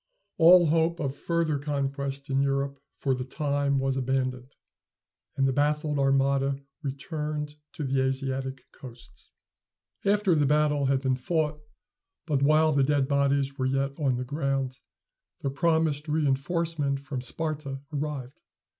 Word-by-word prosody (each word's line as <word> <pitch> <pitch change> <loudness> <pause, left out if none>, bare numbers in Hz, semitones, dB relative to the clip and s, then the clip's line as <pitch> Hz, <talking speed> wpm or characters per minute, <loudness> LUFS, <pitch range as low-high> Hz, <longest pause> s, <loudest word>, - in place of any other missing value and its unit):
All 175 +2 +8
hope 165 +2 +2
of 140 -3 -2
further 160 -1 0
conquest 140 -1 -3
in 135 0 +2
Europe 140 0 0 0.2
for 135 - 0
the 125 0 -2
time 140 0 0
was 135 0 0
abandoned, 130 0 -1 0.9
and 135 0 +3
the 135 - +1
baffled 150 +1 +1
armada 135 0 +2 0.2
returned 150 +1 -4 0.2
to 155 - -5
the 135 -1 +1
Asiatic 130 0 -2
coasts. 120 -3 -12 0.7
After 200 -2 +3
the 150 -3 +3
battle 150 -1 +2
had 135 0 +1
been 130 -1 +1
fought, 150 +2 -1 0.7
but 145 -5 0
while 155 +2 +4
the 140 -2 +3
dead 140 -1 +2
bodies 140 0 +1
were 130 - +1
yet 135 +1 0
on 135 -4 +1
the 125 - -3
ground, 135 -2 -2 0.6
the 135 - -1
promised 160 -1 +1
reënforcement 150 0 0
from 140 -3 -5
Sparta 140 0 -3
arrived. 140 -3 -4
140 Hz, 135 wpm, -27 LUFS, 135-150 Hz, 0.9 s, All